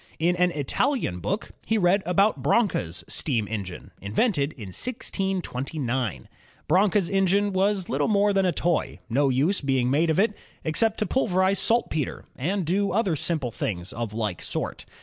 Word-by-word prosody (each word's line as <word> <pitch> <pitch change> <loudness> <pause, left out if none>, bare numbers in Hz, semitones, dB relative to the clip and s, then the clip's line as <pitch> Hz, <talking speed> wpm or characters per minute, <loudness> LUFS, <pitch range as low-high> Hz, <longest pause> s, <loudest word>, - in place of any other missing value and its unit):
Zn 170 +2 +3
an 180 0 +4
Italian 150 - 0
book 200 - -3
he 225 - +1
read 190 +1 +3
about 195 +4 +3
Branca's 90 - +1
steam 115 -8 -1
engine, 100 -5 -6
invented 145 - +1
in 105 -7 -9
1629. 140 - -3 0.4
Branca's 195 +2 +3
engine 195 +1 +2
was 195 0 +1
little 140 +2 0
more 205 -1 +3
than 195 -1 +3
a - - +3
toy, 170 0 0
no 140 +3 +3
use 145 +10 +2
being 130 -3 +1
made 160 +4 +3
of 160 - +2
it, 210 +1 +3 0.3
except 210 +8 +2
to 215 - 0
pulverize 190 -4 +2
saltpeter 225 - 0
and 180 +7 -1
do 200 +5 +1
other 200 -6 +1
simple 150 -5 -1
things 90 -4 -4
of 115 -2 -4
like 105 -5 -3
sort. - - -4
175 Hz, 155 wpm, -25 LUFS, 130-200 Hz, 0.4 s, an